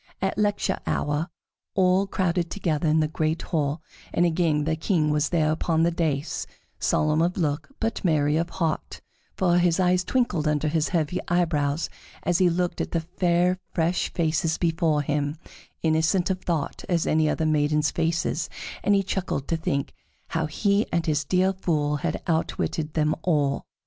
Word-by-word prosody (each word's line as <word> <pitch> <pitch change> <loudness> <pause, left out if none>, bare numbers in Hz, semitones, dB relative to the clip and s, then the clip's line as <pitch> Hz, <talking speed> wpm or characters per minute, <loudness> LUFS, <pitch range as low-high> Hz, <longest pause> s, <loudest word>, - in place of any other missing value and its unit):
At 190 0 -1
lecture 205 -2 0
hour 150 +4 -1 0.5
all 185 +1 +3
crowded 175 -3 0
together 165 -5 -1
in 155 +1 +3
the 155 - +2
great 155 +1 -1
hall, 155 -1 -1 0.3
and 175 - +2
again 160 -3 +1
the 160 +1 0
King 160 -2 +1
was 150 0 +1
there 155 -3 +2
upon 160 0 +1
the 170 - +3
dais, 155 -4 -1 0.3
solemn 155 +1 +2
of 175 +2 +1
look, 150 -4 -1
but 225 0 -2
merry 150 -4 +2
of 165 +2 0
heart, 165 -4 -3 0.3
for 175 -2 +3
his 175 0 +2
eyes 180 0 +3
twinkled 180 - 0
under 150 0 +1
his 155 0 0
heavy 170 0 0
eyebrows 160 -3 +1 0.4
as 175 -1 +1
he 185 -1 +5
looked 175 +1 -1
at - - -4
the 165 - +1
fair, 175 +1 +1 0.2
fresh 170 +1 +1
faces 160 -1 0
before 165 -3 +1
him, 145 +1 -1 0.5
innocent 160 +4 +2
of 185 - -3
thought 165 -5 -2
as 170 -3 +1
any 155 0 +2
other 160 - 0
maidens' 150 -1 +2
faces, 165 0 -1 0.3
and 205 - +4
he 195 - +2
chuckled 185 -7 -2
to 165 - +2
think 140 -4 -2 0.4
how 160 -1 -1
he 200 +7 +1
and 170 - 0
his 150 -1 +1
dear 185 +5 +2
Fool 150 -5 0
had 160 +1 -3
outwitted 160 -1 -1
them 155 -1 +2
all. 145 -6 0
165 Hz, 170 wpm, -25 LUFS, 150-180 Hz, 0.5 s, he